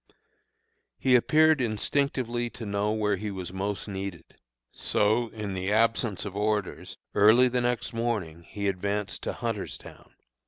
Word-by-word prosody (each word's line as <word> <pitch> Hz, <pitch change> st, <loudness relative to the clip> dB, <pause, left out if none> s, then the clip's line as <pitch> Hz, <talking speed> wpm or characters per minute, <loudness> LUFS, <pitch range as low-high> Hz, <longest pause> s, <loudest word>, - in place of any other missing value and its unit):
He 130 Hz, -1 st, +3 dB
appeared 155 Hz, +4 st, +4 dB
instinctively 120 Hz, +1 st, 0 dB
to 115 Hz, -, -8 dB
know 100 Hz, +1 st, 0 dB
where 105 Hz, -2 st, +1 dB
he 105 Hz, +2 st, -4 dB
was 95 Hz, -3 st, -6 dB
most 100 Hz, +2 st, -3 dB
needed; 95 Hz, -3 st, -5 dB, 0.5 s
so 110 Hz, +3 st, +2 dB
in 105 Hz, -3 st, -5 dB
the 95 Hz, +1 st, -2 dB
absence 115 Hz, -1 st, +1 dB
of 100 Hz, -1 st, -6 dB
orders, 105 Hz, -1 st, -2 dB, 0.2 s
early 110 Hz, +5 st, +6 dB
the 125 Hz, 0 st, 0 dB
next 120 Hz, -1 st, -1 dB
morning 105 Hz, -9 st, -2 dB
he 100 Hz, +3 st, -4 dB
advanced 100 Hz, +2 st, -2 dB
to -, -, -3 dB
Hunterstown. -, -, -6 dB
105 Hz, 135 wpm, -27 LUFS, 100-120 Hz, 0.5 s, early